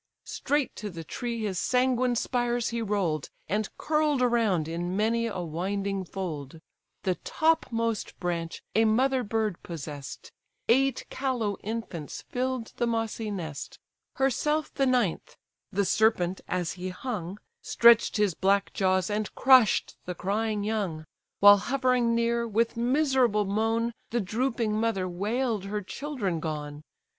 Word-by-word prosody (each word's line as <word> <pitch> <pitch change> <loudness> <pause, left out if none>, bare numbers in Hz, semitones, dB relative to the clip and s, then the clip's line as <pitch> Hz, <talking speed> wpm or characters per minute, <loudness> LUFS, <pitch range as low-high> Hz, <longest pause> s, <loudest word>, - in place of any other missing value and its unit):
Straight 290 -1 -1
to 210 - -5
the 170 -3 -7
tree 235 +6 -4
his 190 -4 -1
sanguine 250 -1 +2
spires 240 0 0
he 235 0 -2
roll'd, 190 -9 -1 0.2
And 210 +1 -1
curl'd 305 -2 +1
around 220 -10 +2
in 175 +3 -3
many 230 +2 +1
a 195 -5 -4
winding 190 +4 -2
fold; 165 -6 -6 0.4
The 185 - +2
topmost 230 -9 0
branch 170 -2 -3
a 225 +1 +4
mother 255 +4 +3
bird 215 -3 -1
possess'd; 145 -4 -8 0.4
Eight 270 +2 +3
callow 245 -7 -1
infants 205 -8 -5
fill'd 255 -2 -2
the 240 - +1
mossy 225 -1 -2
nest; 165 -8 -6 0.4
Herself 300 +3 0
the 270 -1 +1
ninth; 245 -9 0 0.3
the 200 0 +1
serpent, 190 -3 +2
as 180 -2 -1
he 185 0 -5
hung, 185 -2 -5 0.2
Stretch'd 235 -2 +5
his 210 -4 +2
black 195 +3 +1
jaws 185 -2 +2
and 210 0 -2
crush'd 255 -5 +5
the 180 - -4
crying 210 +2 -1
young; 200 -8 -2 0.4
While 205 0 +10
hovering 250 +1 +1
near, 235 0 +1
with 230 +1 +1
miserable 250 -3 +2
moan, 225 +3 0 0.2
The 240 - 0
drooping 230 +2 -1
mother 215 -4 0
wail'd 210 +4 -1
her 205 +1 -3
children 210 - -3
gone. 150 -2 -5
215 Hz, 135 wpm, -28 LUFS, 185-240 Hz, 0.4 s, While